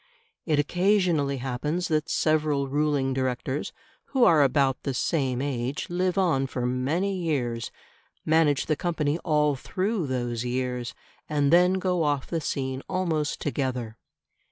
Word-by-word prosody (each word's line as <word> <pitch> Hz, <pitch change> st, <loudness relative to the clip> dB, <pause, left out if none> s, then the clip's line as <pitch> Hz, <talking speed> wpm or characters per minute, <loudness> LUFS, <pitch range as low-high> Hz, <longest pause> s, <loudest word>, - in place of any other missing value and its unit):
It 155 Hz, -3 st, +2 dB
occasionally 175 Hz, -3 st, +2 dB
happens 135 Hz, +7 st, -2 dB
that 155 Hz, 0 st, 0 dB
several 150 Hz, -3 st, +1 dB
ruling 145 Hz, -1 st, +1 dB
directors 130 Hz, +1 st, -2 dB, 0.3 s
who 265 Hz, -3 st, +1 dB
are 160 Hz, -8 st, +6 dB
about 135 Hz, -1 st, +2 dB
the 135 Hz, -2 st, -3 dB
same 130 Hz, -3 st, 0 dB
age 135 Hz, +2 st, -3 dB
live 180 Hz, +1 st, 0 dB
on 160 Hz, -8 st, +2 dB
for 125 Hz, -2 st, -3 dB
many 145 Hz, +11 st, 0 dB
years, 130 Hz, -10 st, -2 dB, 0.6 s
manage 155 Hz, -3 st, +3 dB
the 155 Hz, -, +1 dB
company 155 Hz, -1 st, -1 dB
all 150 Hz, -3 st, +2 dB
through 185 Hz, -, -2 dB
those 120 Hz, -2 st, -2 dB
years, 125 Hz, 0 st, -3 dB, 0.3 s
and 145 Hz, 0 st, +2 dB
then 180 Hz, +1 st, +6 dB
go 185 Hz, -2 st, 0 dB
off 145 Hz, -3 st, 0 dB
the 165 Hz, -2 st, -3 dB
scene 130 Hz, -2 st, -3 dB
almost 165 Hz, -6 st, -1 dB
together. 125 Hz, -6 st, -3 dB
145 Hz, 135 wpm, -26 LUFS, 130-165 Hz, 0.6 s, are